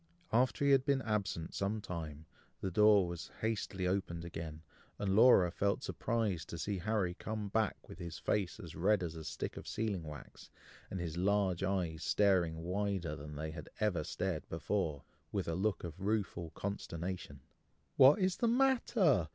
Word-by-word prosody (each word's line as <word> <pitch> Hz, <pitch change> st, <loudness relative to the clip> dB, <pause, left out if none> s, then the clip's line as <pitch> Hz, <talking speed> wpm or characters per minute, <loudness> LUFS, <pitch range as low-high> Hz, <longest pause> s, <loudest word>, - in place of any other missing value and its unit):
After 125 Hz, +2 st, +3 dB
he 140 Hz, -, +5 dB
had 135 Hz, -1 st, +5 dB
been 140 Hz, -1 st, +1 dB
absent 100 Hz, -7 st, -2 dB
some 100 Hz, +2 st, -1 dB
time, 80 Hz, -6 st, -6 dB, 0.3 s
the 95 Hz, -, -2 dB
door 105 Hz, 0 st, +6 dB
was 85 Hz, -1 st, -6 dB
hastily 105 Hz, -4 st, -1 dB
opened 90 Hz, -3 st, -1 dB
again, 80 Hz, -2 st, -6 dB, 0.3 s
and 95 Hz, -1 st, 0 dB
Laura 105 Hz, -6 st, +7 dB
felt 100 Hz, +3 st, 0 dB
surprised 110 Hz, -8 st, -1 dB
to 85 Hz, -, -5 dB
see 95 Hz, +5 st, -2 dB
Harry 100 Hz, -2 st, 0 dB
come 105 Hz, +2 st, -4 dB
back 110 Hz, -1 st, 0 dB
with -, -, -11 dB
his 85 Hz, -2 st, -6 dB
face 100 Hz, -4 st, -1 dB
as 85 Hz, -3 st, -9 dB
red 95 Hz, +2 st, +3 dB
as 85 Hz, -2 st, -3 dB
a 80 Hz, -1 st, -7 dB
stick -, -, -4 dB
of -, -, -8 dB
sealing 105 Hz, -5 st, -1 dB
wax, 75 Hz, -2 st, -10 dB, 0.4 s
and 95 Hz, -, -4 dB
his 85 Hz, -1 st, -4 dB
large 95 Hz, -1 st, +2 dB
eyes 90 Hz, -5 st, -1 dB
staring 90 Hz, -5 st, +2 dB
wider 95 Hz, -3 st, -1 dB
than 75 Hz, +1 st, -8 dB
they 80 Hz, +1 st, -4 dB
had 80 Hz, -2 st, -8 dB
ever 95 Hz, -7 st, +1 dB
stared 90 Hz, 0 st, -3 dB
before, 80 Hz, -4 st, -1 dB, 0.3 s
with -, -, -2 dB
a 85 Hz, -, 0 dB
look 95 Hz, +3 st, 0 dB
of 85 Hz, 0 st, -6 dB
rueful 100 Hz, -4 st, -1 dB
consternation. 90 Hz, -6 st, -4 dB, 0.5 s
"What 135 Hz, +3 st, +8 dB
is 185 Hz, -2 st, +1 dB
the 235 Hz, -, +2 dB
matter!" 230 Hz, -, +3 dB
95 Hz, 170 wpm, -34 LUFS, 85-105 Hz, 0.5 s, What